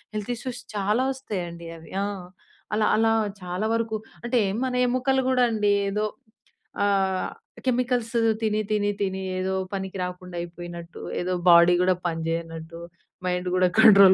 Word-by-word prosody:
Health 210 +3 -3
issues 250 0 -6
చాలా 210 +5 +1
వస్తాయండి 175 -10 -5
అవి. 165 - -14
ఆ! - - -1 0.7
అలా, 215 0 +2
అలా 225 0 +4 0.3
చాలా 180 +4 -2
వరకు 225 -1 -1 0.3
అంటే 240 +1 +2 0.2
మన 260 -1 -1
ఎముకలు 255 +2 +2
కూడా 250 -1 +4
అండి 210 -2 +2 0.2
ఏదో 210 +2 0 0.8
ఆహ్, 195 -2 +1 0.4
కెమికల్స్ 245 -2 0 0.3
తిని, 215 -1 +1
తిని, 205 -1 +2
తిని 190 -1 -1 0.2
ఏదో 190 +1 -1 0.2
పనికి 190 0 -4
రాకుండా 180 0 -5
అయిపోయినట్టు, 170 -1 -8 0.2
ఏదో 180 +1 -1
బాడీ 170 0 +8
గూడా 185 0 +3
పనిచేయనట్టు, 165 0 -4 0.5
మైండ్ 180 0 -1
గూడా 185 0 +4
కంట్రోల్ 200 -4 +9
195 Hz, 135 wpm, -25 LUFS, 180-225 Hz, 0.8 s, కంట్రోల్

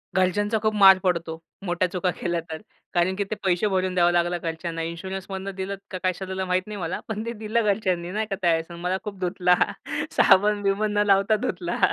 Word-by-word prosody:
घरच्यांचा 205 +4 +2
खूप 215 0 +1
मार 195 -2 +8
पडतो. 170 -3 -1 0.3
मोठ्या 175 0 +1
चुका 180 0 0
केल्या 175 -1 -1
तर. 160 - -5 0.3
कारण 185 +1 +2
की 200 - 0
ते 205 +2 -4
पैसे 185 +2 +2
भरून 185 -1 0
द्यावं 175 -1 +4
लागलं 175 0 +1
घरच्यांना. 165 0 -4
इन्शुरन्समधनं 190 +3 -5
दिलं 190 +1 -3 0.2
का 185 - -3
कसं 185 +1 -1
दिलं 190 0 -3
माहीत 185 0 +1
नाही 210 - -6
मला. 170 0 -3
पण 220 0 -4
ते 235 - -3
दिलं 225 +2 +1
घरच्यांनी 185 -4 0
नाही 215 +3 -1
का 195 - -1
त्यावेळेस 165 -2 +2
अन् 170 0 -9
मला 180 +1 0
खूप 205 -3 -7
धुतला. 180 0 +2 0.6
साबण-बिबण 205 +1 +3
न 205 - +4
लावता 195 +2 +4
धुतला. 175 -4 -3
185 Hz, 195 wpm, -24 LUFS, 175-200 Hz, 0.6 s, मार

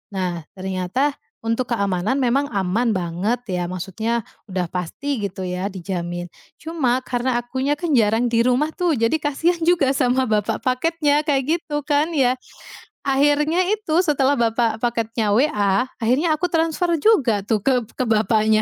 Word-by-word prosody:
Nah, 175 -4 -3
ternyata 190 +9 -1 0.3
untuk 230 +2 -1
keamanan 200 +4 0
memang 260 +3 +2
aman 205 +4 +1
banget, 185 +6 -1
ya. 180 -1 -1
Maksudnya, 190 +6 -2 0.2
udah 185 -4 -3
pasti, 185 - -3
gitu 190 -1 -6
ya, 185 +2 -3
dijamin. 175 -1 -4 0.3
Cuma, 275 -6 0
karena 245 -1 -1
akunya 260 +4 -1
kan 335 +3 -4
jarang 225 +2 +2
di 230 0 +2
rumah 255 +5 +2
tuh, 350 -1 +1
jadi 230 -2 +1
kasihan 315 +4 0
juga 335 -6 +3
sama 260 -2 +1
bapak 210 -1 0
paketnya, 295 +3 +1
kayak 275 -3 +1
gitu 295 -4 -4
kan, 295 +3 +1
ya. 260 -4 +2 0.6
Akhirnya 295 +5 +2
itu, 420 -7 0
setelah 285 -3 +2
bapak 230 -1 +1
paketnya 230 -2 0
WA, 210 -4 +2
akhirnya 280 +8 +1
aku 360 - -1
transfer 330 +1 +1
juga 265 - +3
tuh, 215 +3 0
ke 255 0 +3 0.2
ke 255 - 0
bapaknya. 215 -1 +3
240 Hz, 150 wpm, -21 LUFS, 205-290 Hz, 0.6 s, juga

